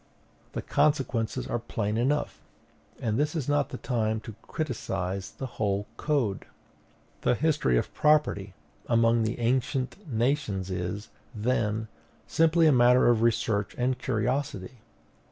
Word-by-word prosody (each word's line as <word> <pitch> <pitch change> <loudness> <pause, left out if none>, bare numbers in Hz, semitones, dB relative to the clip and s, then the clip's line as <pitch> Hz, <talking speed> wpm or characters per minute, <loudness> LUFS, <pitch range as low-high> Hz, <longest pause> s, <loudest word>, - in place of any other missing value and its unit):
The - - -4
consequences 130 -5 +1
are 120 - -2
plain 105 -2 -2
enough, 135 +6 0 0.6
and 110 0 -1
this 150 +2 0
is 150 -6 -2
not 145 -1 +1
the - - -6
time 110 -3 -1
to 110 0 -8
criticise 95 - -3
the 135 - -7
whole 105 -4 -1
Code. 130 -11 -1 0.8
The 125 - +2
history 150 - +2
of - - -2
property 125 -11 +2 0.3
among 115 0 +3
the 110 +1 -1
ancient 130 - -1
nations 115 -6 0
is, 90 +4 -4 0.3
then, 110 -1 0 0.4
simply 165 +1 +3
a 155 - +6
matter 125 -1 +5
of 115 -2 +3
research 110 -3 +1
and 125 +1 0
curiosity. 125 -1 -2
120 Hz, 130 wpm, -28 LUFS, 105-140 Hz, 0.8 s, a